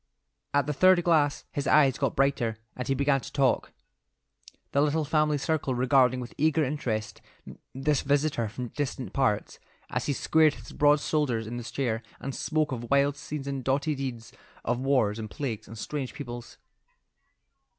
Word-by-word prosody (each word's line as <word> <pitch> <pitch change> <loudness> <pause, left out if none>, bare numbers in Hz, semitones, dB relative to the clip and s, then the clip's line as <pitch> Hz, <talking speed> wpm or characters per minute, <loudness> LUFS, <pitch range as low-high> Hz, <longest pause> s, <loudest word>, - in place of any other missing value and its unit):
At 145 0 +2
the 150 - -1
third 185 +3 +5
glass 155 -4 +2
his 145 0 -3
eyes 140 -4 +4
got - - 0
brighter, 135 -5 +1 0.2
and 125 -1 -5
he 135 - +1
began 140 0 +2
to - - -9
talk, 135 -3 +1 1.0
the 140 - +3
little 150 +1 +1
family 150 0 +2
circle 145 -3 -1
regarding 130 0 +3
with 125 -1 -7
eager 155 +1 +3
interest 125 -6 -3 0.5
this 140 +2 +1
visitor 140 -5 +1
from 120 +2 -6
distant 130 -7 -4
parts, 130 -7 0 0.3
as - - -2
he 145 - +1
squared 155 +2 +3
his 120 -2 -12
broad 145 0 +4
shoulders 130 -9 0
in 120 +2 -5
the 120 - -5
chair 115 -2 -2 0.2
and 135 - -5
spoke 155 0 0
of 120 -2 -5
wild 140 0 +3
scenes 145 -1 -6
and 140 -2 -3
doughty 135 +4 +1
deeds; 130 -5 -5 0.3
of 120 +1 0
wars 125 -6 +1
and 110 -1 -5
plagues 120 -5 -4
and 110 +3 -10
strange 135 +3 -4
peoples. 120 -4 -8
135 Hz, 170 wpm, -28 LUFS, 120-145 Hz, 1.0 s, third